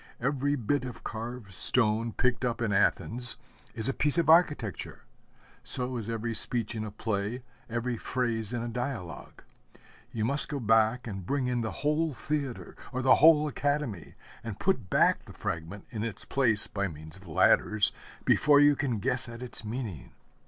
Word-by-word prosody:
Every 140 Hz, +2 st, 0 dB
bit 140 Hz, +2 st, -1 dB
of 125 Hz, -2 st, -8 dB
carved 115 Hz, -2 st, -7 dB
stone 115 Hz, +2 st, +1 dB
picked 125 Hz, +3 st, 0 dB
up 120 Hz, -2 st, -1 dB
in 115 Hz, -3 st, -1 dB
Athens 115 Hz, +4 st, +3 dB, 0.4 s
is 110 Hz, -1 st, -1 dB
a 135 Hz, -, 0 dB
piece 150 Hz, +4 st, +2 dB
of 165 Hz, -2 st, +4 dB
architecture; 150 Hz, -, +1 dB, 0.6 s
so 125 Hz, 0 st, 0 dB
is 115 Hz, -2 st, -5 dB
every 115 Hz, 0 st, -3 dB
speech 115 Hz, 0 st, +2 dB
in 110 Hz, -2 st, -4 dB
a 110 Hz, -, -5 dB
play, 105 Hz, +3 st, -3 dB, 0.3 s
every 120 Hz, +1 st, -2 dB
phrase 115 Hz, -3 st, -2 dB
in 120 Hz, -1 st, -3 dB
a -, -, -4 dB
dialogue. 120 Hz, -, -6 dB, 0.7 s
You 110 Hz, -2 st, -2 dB
must 140 Hz, +3 st, +1 dB
go 145 Hz, -1 st, -3 dB
back 115 Hz, +1 st, +2 dB
and 95 Hz, -4 st, -6 dB
bring 135 Hz, +7 st, -1 dB
in 125 Hz, -1 st, -1 dB
the 110 Hz, -, -2 dB, 0.2 s
whole 150 Hz, 0 st, +1 dB
Theatre 140 Hz, 0 st, -3 dB, 0.2 s
or 130 Hz, -1 st, -3 dB
the 130 Hz, -, +5 dB
whole 155 Hz, -1 st, +6 dB
Academy, 145 Hz, -, -3 dB, 0.3 s
and 110 Hz, -4 st, -7 dB
put 130 Hz, -, -1 dB
back -, -, +2 dB
the -, -, -12 dB
fragment 85 Hz, +4 st, -5 dB
in 110 Hz, -4 st, -5 dB
its 115 Hz, -3 st, -5 dB
place 115 Hz, -6 st, +5 dB
by 100 Hz, -1 st, -2 dB
means 80 Hz, -1 st, -11 dB
of 95 Hz, -1 st, -16 dB
ladders, 105 Hz, +5 st, +3 dB, 0.3 s
before 145 Hz, -1 st, +4 dB
you 145 Hz, 0 st, +5 dB
can 135 Hz, -5 st, -2 dB
guess 125 Hz, +5 st, +1 dB
at 115 Hz, +1 st, -8 dB
its 125 Hz, -, -6 dB
meaning. 110 Hz, -, -6 dB
120 Hz, 175 wpm, -28 LUFS, 110-135 Hz, 0.7 s, whole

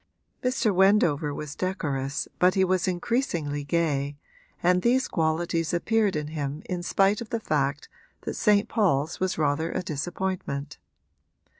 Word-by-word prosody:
Mr. 250 Hz, -4 st, +1 dB
Wendover 180 Hz, -6 st, +3 dB
was 145 Hz, 0 st, -6 dB
decorous 145 Hz, -7 st, -2 dB
but 180 Hz, +2 st, +4 dB
he 190 Hz, -, +4 dB
was 185 Hz, 0 st, +1 dB
increasingly 175 Hz, -, -1 dB
gay, 145 Hz, -3 st, 0 dB, 0.5 s
and 180 Hz, +1 st, +4 dB
these 250 Hz, +4 st, +2 dB
qualities 165 Hz, +1 st, 0 dB
appeared 215 Hz, +2 st, +1 dB
in 150 Hz, -1 st, -2 dB
him 150 Hz, -1 st, -4 dB
in 180 Hz, -1 st, -3 dB
spite 195 Hz, +4 st, +2 dB
of 230 Hz, -, -7 dB
the 230 Hz, -, -1 dB
fact 145 Hz, -6 st, -1 dB, 0.3 s
that -, -, -4 dB
St. 210 Hz, -2 st, +3 dB
Paul's 165 Hz, -, +1 dB
was 185 Hz, 0 st, -1 dB
rather 155 Hz, +1 st, 0 dB
a -, -, -2 dB
disappointment. 155 Hz, -3 st, -4 dB
170 Hz, 140 wpm, -26 LUFS, 145-190 Hz, 0.5 s, but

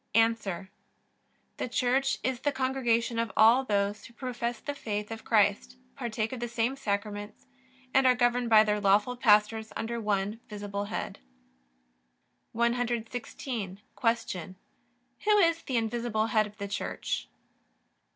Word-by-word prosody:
A. 225 Hz, -5 st, +2 dB, 0.9 s
The -, -, -3 dB
Church 255 Hz, +3 st, +1 dB
is 260 Hz, -2 st, -1 dB
the 290 Hz, -, 0 dB
congregation 240 Hz, -4 st, 0 dB
of 230 Hz, -1 st, -1 dB
all 230 Hz, +5 st, +6 dB
those 205 Hz, -3 st, -1 dB
who 235 Hz, -, -14 dB
profess 240 Hz, -2 st, -3 dB
the 285 Hz, -, -4 dB
faith 210 Hz, -5 st, -4 dB
of 225 Hz, 0 st, -6 dB
Christ, 65 Hz, -, +2 dB, 0.2 s
partake 220 Hz, -1 st, -2 dB
of 255 Hz, -, -5 dB
the 240 Hz, -, -2 dB
same 235 Hz, +2 st, 0 dB
Sacraments, 205 Hz, -2 st, -4 dB, 0.5 s
and 265 Hz, -1 st, +5 dB
are 250 Hz, -, +5 dB
governed 245 Hz, -1 st, +2 dB
by 215 Hz, -1 st, +8 dB
their 210 Hz, -1 st, 0 dB
lawful 205 Hz, +5 st, +3 dB
pastors 220 Hz, -2 st, +3 dB
under 230 Hz, +1 st, -3 dB
one 205 Hz, +1 st, -1 dB
visible 205 Hz, -1 st, -4 dB
head. 205 Hz, -, -5 dB, 1.3 s
116. 235 Hz, -3 st, -2 dB, 0.2 s
Q. 225 Hz, -7 st, -1 dB, 0.7 s
Who 425 Hz, 0 st, +5 dB
is 335 Hz, -4 st, +3 dB
the 255 Hz, -, -2 dB
invisible 225 Hz, -1 st, 0 dB
Head 215 Hz, -1 st, +4 dB
of 210 Hz, +1 st, -16 dB
the 200 Hz, -1 st, -4 dB
Church? 200 Hz, -, -3 dB
225 Hz, 135 wpm, -29 LUFS, 210-245 Hz, 1.3 s, by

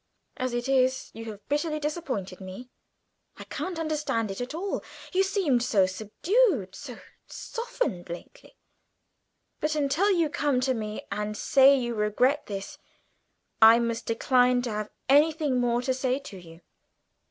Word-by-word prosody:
As 255 Hz, -1 st, -2 dB
it 240 Hz, +1 st, -2 dB
is, 260 Hz, -1 st, +1 dB
you 225 Hz, +1 st, -8 dB
have 210 Hz, -2 st, -9 dB
bitterly 305 Hz, +1 st, -1 dB
disappointed 285 Hz, -, -4 dB
me; 190 Hz, +7 st, -9 dB, 0.7 s
I -, -, -8 dB
can't 370 Hz, -2 st, -5 dB
understand 300 Hz, -9 st, -1 dB
it 195 Hz, -, -6 dB
at 250 Hz, +5 st, -5 dB
all. 390 Hz, +4 st, -3 dB, 0.3 s
You 375 Hz, -, +3 dB
seemed 380 Hz, -, +1 dB
so 215 Hz, -6 st, +3 dB
subdued, 220 Hz, -, +1 dB
so 250 Hz, -5 st, -9 dB, 0.3 s
softened 460 Hz, -, -4 dB
lately. 175 Hz, -, -10 dB, 1.0 s
But 305 Hz, 0 st, -1 dB
until 300 Hz, +7 st, +2 dB
you 340 Hz, -5 st, +3 dB
come 290 Hz, -4 st, 0 dB
to 260 Hz, 0 st, +1 dB
me 215 Hz, -2 st, -5 dB
and 210 Hz, +1 st, -3 dB
say 275 Hz, +4 st, +6 dB
you 240 Hz, -2 st, -2 dB
regret 235 Hz, +7 st, +1 dB
this, 195 Hz, -1 st, -6 dB, 0.8 s
I 225 Hz, +1 st, +9 dB
must 235 Hz, -1 st, -2 dB
decline 250 Hz, +1 st, +3 dB
to 240 Hz, -, -3 dB
have 210 Hz, 0 st, -3 dB, 0.2 s
anything 295 Hz, -1 st, +3 dB
more 240 Hz, 0 st, +1 dB
to 260 Hz, 0 st, +1 dB
say 260 Hz, 0 st, 0 dB
to 275 Hz, -8 st, -10 dB
you. 165 Hz, -1 st, -14 dB
255 Hz, 150 wpm, -27 LUFS, 215-300 Hz, 1.0 s, I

